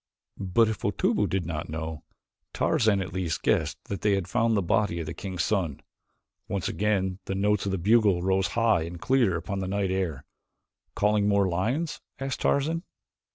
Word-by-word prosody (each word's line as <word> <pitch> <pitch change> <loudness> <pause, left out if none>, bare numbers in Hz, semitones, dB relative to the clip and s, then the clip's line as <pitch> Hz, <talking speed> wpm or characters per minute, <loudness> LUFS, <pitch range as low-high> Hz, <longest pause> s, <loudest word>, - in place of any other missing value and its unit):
But 100 +4 +3
if 110 -2 -2
Otobu - - +1
did 95 -3 -1
not 80 -2 -4
know, 80 0 -4 0.5
Tarzan 105 -3 +2
at 95 - -8
least 90 -3 -2
guessed - - +1
that 100 - -5
they 105 - +3
had 95 -3 -2
found 115 -2 +2
the 100 - +1
body 90 -1 +1
of 80 - -3
the 80 - -5
king's 90 -2 -3
son. 90 -9 0 0.7
Once 100 -3 -2
again 95 -3 0
the 95 - -3
notes 105 0 +1
of - - 0
the 95 - 0
bugle 100 -1 +3
rose 95 0 +2
high 115 -7 +3
and 85 +1 -6
clear 120 -6 +2
upon 95 +4 -4
the 95 - -3
night 95 -1 0
air. 85 -7 -2 0.7
"Calling 105 0 +2
more 100 -1 +3
lions?" 120 - -1 0.2
asked 135 0 -4
Tarzan. 160 +4 +1
95 Hz, 180 wpm, -27 LUFS, 90-105 Hz, 0.7 s, But